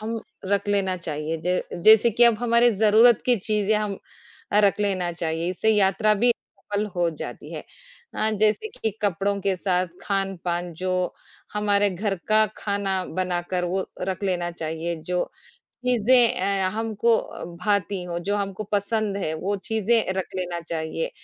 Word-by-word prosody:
हम 225 +1 -3 0.3
रख 200 +1 0
लेना 195 -2 +1
चाहिए 160 -2 -4
ज 180 0 +2 0.2
जैसे 220 +2 +7
कि 240 +3 +5
अब 235 -2 +5
हमारी 240 0 +4
ज़रूरत 220 +2 +5
की 250 -1 +4
चीज़ें 210 +1 0
हम 210 -1 -1 0.6
अ, 210 - +5
रख 200 0 +3
लेना 185 -4 0
चाहिए, 165 0 -2
इससे 200 +4 +1
यात्रा 210 +1 +3
भी 245 +1 +5
सफल 205 -2 -5
हो 175 -1 +2
जाती 155 - -8
है। - - -5 0.5
अ, 220 - 0
जैसे 215 - +2
कि 220 - 0
कपड़ों 200 0 0
के 195 -1 0
साथ 180 -1 0 0.2
खान-पान 180 -3 -2
जो 185 -1 0 0.4
हमारे 205 -1 +2
घर 195 +2 -1
का 215 0 +5
खाना 195 -2 -1 0.2
बनाकर 180 0 -1
वो 185 +2 -1
रख 185 +1 -3
लेना 175 -2 0
चाहिए, 165 0 -4
जो 175 +3 -2 0.5
चीज़ें 245 0 +4
अ, 195 -1 +1
हमको 225 +1 +2
अ, - - -7 0.2
भाती 200 -2 0
हो, 170 -1 -3
जो 200 +4 -1
हमको 200 0 -3
पसंद 205 0 0
हैं, 160 -5 -2
वो 195 +6 -2
चीज़ें 220 -1 +2
रख 190 - -2
लेना 175 -2 -3
चाहिए, 165 - -3
200 Hz, 160 wpm, -24 LUFS, 180-215 Hz, 0.6 s, जैसे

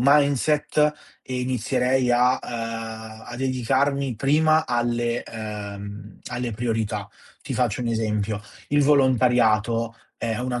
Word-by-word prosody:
mindset 145 +2 +3 0.3
e 130 -1 -4
inizierei 125 +1 +1
a 125 +1 +5
uhm, 110 -1 -6
a - - -7
dedicarmi 130 +1 0
prima 155 +5 +3
alle 120 -1 0
ehm, 105 -1 -7
alle 125 -1 -2
priorità. 110 -3 -2 0.3
Ti - - -4
faccio 125 -2 0
un 120 - -2
esempio: 105 -2 -1 0.3
il 145 0 +3
volontariato 120 -5 +3 0.2
è 115 -2 -2
una 125 0 -2
120 Hz, 115 wpm, -24 LUFS, 110-130 Hz, 0.3 s, a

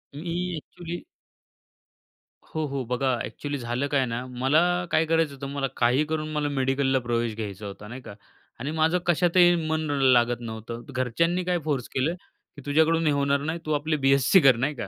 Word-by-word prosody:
मी 165 +3 -4 0.2
actually 170 - -7 1.5
हो. 155 -1 -1
हो. 135 -1 -3
बघा 125 +2 0
ॲक्चुअली 145 -1 -5
झालं 120 +3 -2
काय 135 -2 +1
ना, 120 +1 -4
मला 130 +5 +2 0.3
काय 160 - +3
करायचं 160 -2 +1
होतं 140 0 -7
मला 140 -1 -1
काही 125 +5 +3
करून 155 0 -3
मला 150 -1 0
मेडिकलला 135 -1 +1
प्रवेश 120 -2 -1
घ्यायचा 105 -2 -6
होता 100 +1 -9
नाही 125 +3 -8
का 100 - -10 0.5
आणि 145 +3 -3
माझं 160 +2 +2
कशातही 175 +1 +4
मन 160 0 0 0.2
लागत 120 -2 +4
नव्हतं. 115 +1 -7
घरच्यांनी 165 +8 0
काय 175 -1 0
फोर्स 140 -6 -2
केलं 140 +6 +1 0.4
की 145 - -10
"तुझ्याकडून 160 +3 +3
हे - - +4
होणार 140 0 +1
नाही, 160 +3 -3
तू 155 - -2
आपली 155 +2 0
बी-एस-सी 135 +6 +4
कर 135 -3 +6
नाही 140 +5 -1
का. 100 - -5
140 Hz, 180 wpm, -26 LUFS, 125-155 Hz, 1.5 s, कर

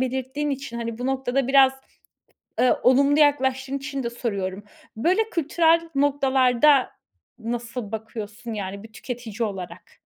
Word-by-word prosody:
belirttiğin 265 +3 -2
için, 275 -3 -5
hani, 230 -1 -4
bu 245 - -3
noktada 265 -1 -1
biraz, 270 -1 +6 0.9
ııı, 250 - +3
olumlu 280 +3 +4
yaklaştığın 270 -2 +2
için 275 0 -5
de 235 - -3
soruyorum: 200 -5 -4 0.3
Böyle 375 - +1
kültürel 330 0 +2
noktalarda 270 -1 +3 0.5
nasıl 235 -1 -5
bakıyorsun, 220 +1 -6
yani, 200 -1 -5
bir 220 0 -14
tüketici 235 -2 -4
olarak? 190 -3 -9
255 Hz, 125 wpm, -24 LUFS, 230-275 Hz, 0.9 s, biraz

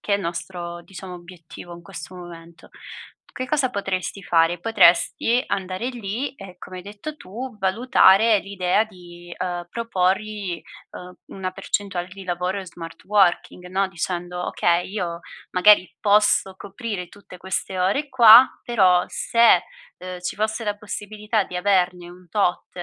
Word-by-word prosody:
che 205 - 0
il 200 - -1
nostro, 175 0 -6
diciamo, 185 0 -10
obiettivo 175 -1 -12
in 170 - -13
questo 170 -2 -10
momento. 170 -1 -12 0.7
Che 255 - -4
cosa 265 -1 0
potresti 195 -2 -3
fare, 165 0 +2
potresti 225 +4 +3
andare 185 +3 -3
lì 240 +2 -4
e, 190 -6 -12
come 185 0 -9
hai - - -9
detto 210 +10 -8
tu, 240 +2 -8
valutare 210 +1 +4
l'idea 195 +1 0
di, 175 -4 -13
uhm, 175 -1 -3
proporgli, 195 -4 -1 0.3
uhm, 180 0 -10 0.2
una 185 -1 -3
percentuale 195 -1 -3
di 195 +1 -11
lavoro 180 +2 -2
in 195 - -7
smart 165 -1 -10
working, 190 -2 +1
no, 195 +1 0
dicendo: 180 0 -4
"Okay, 175 0 +1
io 175 -5 -4 0.3
magari 185 0 +5
posso 205 -2 +3
coprire 200 -2 -6
tutte 200 -2 -14
queste 190 +1 -4
ore 200 +11 0
qua, 240 0 +9 0.2
però 185 -7 +3
se, 235 0 +3 0.4
uhm, 185 -1 -7
ci 180 - -4
fosse 220 +2 -2
la 205 -1 -2
possibilità 210 +1 -3
di 180 - -7
averne 180 -2 +1
un 180 0 -16
tot 195 -2 0
190 Hz, 145 wpm, -22 LUFS, 180-210 Hz, 0.7 s, qua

